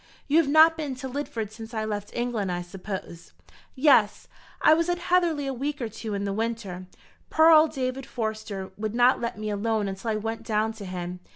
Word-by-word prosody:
"You 295 - +3
have 325 - +2
not 320 +2 +6
been 295 -4 -3
to 260 +1 -6
Lidford 245 -6 -4
since 225 +1 -9
I 215 0 -1
left 205 -1 -4
England, 240 -6 -1
I 175 0 -3
suppose?" 185 -2 -8 0.4
"Yes; 260 -7 +4 0.3
I - - +6
was 335 +2 +1
at 350 - +1
Heatherly 345 -5 +1
a 270 - -2
week 285 +4 -3
or 235 -3 -3
two 215 -1 -5
in 200 - -2
the 200 -1 -2
winter. 210 -5 -4 0.4
Poor 320 +1 +6
old 315 -1 +6
David 260 -1 -3
Forster 215 -4 -4
would 215 +1 -3
not 245 +2 +4
let 235 -2 -3
me 215 0 -3
alone 210 0 0
until 195 +3 -4
I 220 - +1
went 225 +1 -3
down 220 -1 0
to 210 -2 -9
him. 180 -1 -5
225 Hz, 205 wpm, -26 LUFS, 205-270 Hz, 0.4 s, not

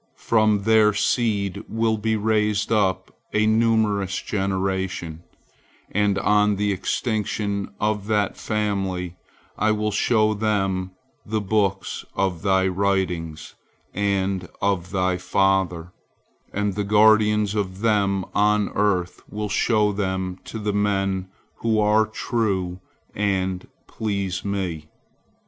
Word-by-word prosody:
From 110 -3 +2
their 110 -1 +5
seed 105 -4 0
will 115 0 +1
be 110 +1 0
raised 105 -1 +1
up 100 -4 0 0.2
a 110 0 +3
numerous 110 -3 +2
generation, 95 -4 -2 0.7
and 105 -1 +1
on 105 0 +3
the 105 +1 0
extinction 100 0 -2
of 105 -1 -1
that 105 -2 +1
family, 95 -4 -2 0.4
I 110 - +3
will 105 0 -1
show 110 +1 +2
them 95 -3 0 0.3
the 110 +1 -2
books 100 -1 -1
of 95 -4 -1
thy 95 -1 +2
writings 90 -5 -1 0.4
and 95 -2 -1
of 95 -3 0
thy 95 -1 0
father, 95 -2 0 0.6
and 105 -1 -1
the 105 +2 -2
guardians 105 0 +4
of 100 -2 -3
them 100 -4 +1
on 105 0 +2
earth 95 -4 0
will 105 0 -4
show 105 0 +2
them 95 -2 -2
to - - -6
the 105 -1 -2
men 95 -2 0 0.3
who 110 -1 +1
are 105 +1 +3
true 100 -5 -2 0.3
and 95 -2 -1 0.2
please 100 -4 -3
Me. 90 -6 -3
100 Hz, 115 wpm, -23 LUFS, 95-105 Hz, 0.7 s, their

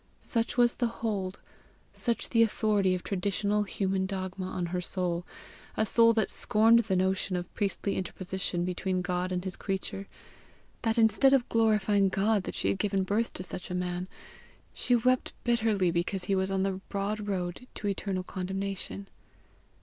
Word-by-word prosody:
Such 230 0 -1
was 240 -1 +4
the 240 - +2
hold, 205 -5 -3 0.5
such 235 -1 -1
the 230 - +4
authority 210 -4 +2
of 180 - -5
traditional 200 +2 0
human 190 -1 -1
dogma 185 -1 -4
on 185 -1 -3
her 180 +1 -2
soul 180 -1 0 0.5
a 220 - +3
soul 230 +2 +5
that 220 -2 +1
scorned 225 +2 +4
the 215 -4 0
notion 190 0 +1
of 175 0 -4
priestly 200 -1 -1
interposition 185 -1 -2
between 185 0 -1
God 180 0 -1
and 180 -1 -1
his 190 -2 -3
creature 195 0 -4 0.7
that, 225 0 +1
instead 230 +4 +5
of 255 -3 +3
glorifying 210 -3 +3
God 200 +1 +1
that - - -5
she - - +1
had 195 - -1
given 195 -2 +1
birth 210 +5 0
to 185 - -2
such 180 0 -6
a 180 - -3
man, 180 0 -2 0.7
she 245 - +2
wept 255 +2 +2
bitterly 220 -6 +2
because 180 +2 -1
he 195 - 0
was 190 0 +1
on 190 -1 0
the 190 -1 -2
broad 205 +1 -2
road 185 +4 -3
to 210 - -3
eternal 195 -2 -2
condemnation. 195 +1 -4
195 Hz, 165 wpm, -29 LUFS, 185-215 Hz, 0.7 s, soul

